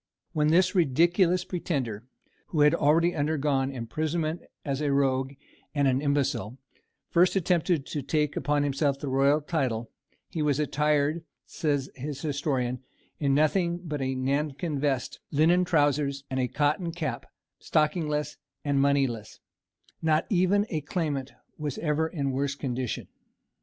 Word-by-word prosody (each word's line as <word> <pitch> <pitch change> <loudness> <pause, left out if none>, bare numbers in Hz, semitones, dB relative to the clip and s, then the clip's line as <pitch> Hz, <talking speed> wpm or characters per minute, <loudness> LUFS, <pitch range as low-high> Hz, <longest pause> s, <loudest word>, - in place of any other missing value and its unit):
When 150 -1 +2
this 180 +4 +4
ridiculous 175 +3 +3
pretender, 130 - -3 0.4
who 155 - 0
had 150 +1 +6
already 165 +3 +3
undergone 145 -3 0
imprisonment 155 +7 -2 0.2
as 140 0 -2
a 145 -2 +1
rogue 135 -1 +1 0.4
and 140 -1 +3
an 130 0 +2
imbecile, 135 -6 0 0.5
first 180 +3 +4
attempted 175 -4 +1
to 145 - -4
take 150 +1 0
upon 145 +1 +1
himself 140 0 +1
the 140 0 -5
royal 140 +3 +3
title, 130 -8 -2 0.4
he 160 - -4
was 150 -1 +1
attired, 150 +2 +1 0.2
says 145 -4 -1
his 140 +1 -6
historian, 135 -4 -1 0.4
in 140 -2 +2
nothing 170 +3 +2
but 150 -4 -4
a 130 0 -1
nankin 140 +3 -1
vest, 135 -3 -1
linen 165 +5 +4
trousers, 145 -4 +1
and 130 - -1
a 125 - +1
cotton 150 - 0
cap, 165 -2 -4 0.3
stockingless 150 -1 0 0.3
and 140 -1 +2
moneyless, 135 -6 0 0.6
not 160 0 +2
even 195 +2 +3
a 155 -3 -1
claimant 145 -3 -2 0.3
was 150 -3 -3
ever 160 0 0
in 140 -5 -2
worse 140 +1 -1
condition. 130 -4 -3
145 Hz, 135 wpm, -27 LUFS, 135-160 Hz, 0.6 s, had